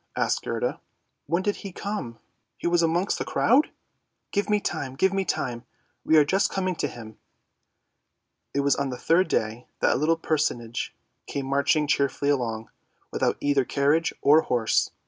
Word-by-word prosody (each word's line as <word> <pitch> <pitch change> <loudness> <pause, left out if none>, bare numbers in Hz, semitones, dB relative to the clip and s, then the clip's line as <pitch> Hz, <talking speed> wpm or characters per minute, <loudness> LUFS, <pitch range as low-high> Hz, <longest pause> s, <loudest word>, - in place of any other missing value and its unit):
asked - - 0
Gerda; - - -3 0.2
" - - -52
when 170 +3 0
did 205 +1 0
he 195 - -8
come? 180 - -5 0.5
was 170 0 +3
he - - +4
amongst 175 +4 0
the - - -1
crowd? 275 +6 +3 0.2
" - - -50
" - - -53
Give 205 +1 -1
me 210 0 +3
time, 130 -9 -4
give 190 +7 +2
me 195 0 +1
time! 120 -7 -2 0.4
we 160 - +4
are 150 - +6
just 195 +6 +2
coming 185 -1 -1
to - - 0
him. 110 -2 -11 1.3
It 140 - 0
was 140 -1 +3
on 140 -1 -1
the 125 - -5
third 170 +8 +3
day 110 +3 -2
that - - +3
a - - 0
little 160 +3 +2
personage 145 -8 -2 0.3
came 140 -1 -3
marching 140 +3 +2
cheerfully 140 0 +1
along, 115 -5 -2 0.4
without - - 0
either 140 -2 +2
carriage 145 +5 +1
or 150 +3 +6
horse. 120 -6 +1
145 Hz, 180 wpm, -25 LUFS, 130-180 Hz, 1.3 s, are